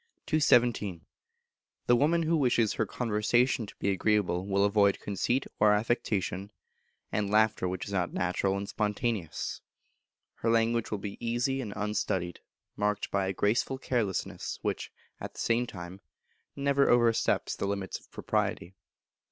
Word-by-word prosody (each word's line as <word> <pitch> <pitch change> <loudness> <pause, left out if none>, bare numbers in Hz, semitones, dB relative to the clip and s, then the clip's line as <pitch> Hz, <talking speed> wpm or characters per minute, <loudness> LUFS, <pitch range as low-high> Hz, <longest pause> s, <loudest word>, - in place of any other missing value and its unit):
The 120 - +3 1.0
Woman 165 +6 +3
who 165 +1 +2
wishes 120 -7 +2
her 110 - -1
conversation 120 +1 +1
to - - -12
be 100 - 0
agreeable 95 -2 +1
will 100 0 +2
avoid 100 -1 +3
conceit 120 +6 -1
or 105 0 +6
affectation, 105 -3 -1 0.6
and 105 -1 0
laughter 110 -2 +3
which 90 0 -3
is - - -7
not 90 -2 0
natural 95 +2 0
and 100 0 -4
spontaneous, 105 -5 -2 0.8
Her 115 - -1
language 115 0 +2
will 105 - -2
be 100 +3 -7
easy 120 +3 0
and 110 -5 -5
unstudied, 95 -4 -2 0.4
marked 105 0 -1
by 100 -1 +1
a 95 - -1
graceful 110 +7 +1
carelessness, 120 -8 -2
which, - - -2 0.3
at - - -7
the - - -10
same 120 +1 +1
time, 90 -1 -9 0.5
never 140 0 +2
oversteps 120 -2 +3
the 100 - -2
limits 100 -1 -3
of - - -24
propriety. 90 - -2
105 Hz, 140 wpm, -29 LUFS, 100-120 Hz, 1.0 s, or